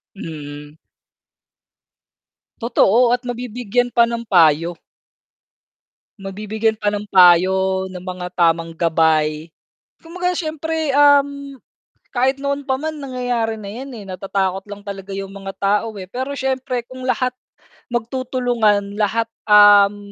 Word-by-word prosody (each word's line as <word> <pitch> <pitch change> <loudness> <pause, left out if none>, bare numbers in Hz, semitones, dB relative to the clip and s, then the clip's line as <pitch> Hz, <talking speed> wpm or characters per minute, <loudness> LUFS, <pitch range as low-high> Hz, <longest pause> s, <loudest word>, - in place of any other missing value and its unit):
Mm. 150 -5 -9 1.8
Totoo 235 +1 +3
at 245 - -8
mabibigyan 245 0 -2
pa 235 - +6
ng 235 0 -4
payo. 165 -1 +3 1.4
Mabibigyan 215 +3 -2
pa 205 - +2
ng 205 0 -4
payo, 190 +1 +5
ng 180 - -7
mga 180 -1 -6
tamang 165 -1 +1
gabay. 160 -1 +1 0.5
Kumbaga 360 +2 -3
siyempre, 320 -1 -3
um, 280 -1 +3 0.5
kahit 265 +2 0
noon 280 0 -2
pa 265 - 0
man 315 0 -4
nangyayari 245 -5 -2
na 200 - -7
yan 260 +6 -8
eh, 225 - -8
natatakot 190 0 -2
lang 205 0 -9
talaga 195 -1 -8
yung 195 0 -5
mga 195 -1 -7
tao 210 +3 +1
eh, 185 - -10
pero 260 +4 -4
siyempre 260 -2 -2
kung 255 0 -9
lahat 255 0 0 0.6
magtutulungan 235 -4 0
lahat, 225 +2 0 0.2
um, 205 -1 +7
210 Hz, 120 wpm, -19 LUFS, 190-255 Hz, 1.8 s, um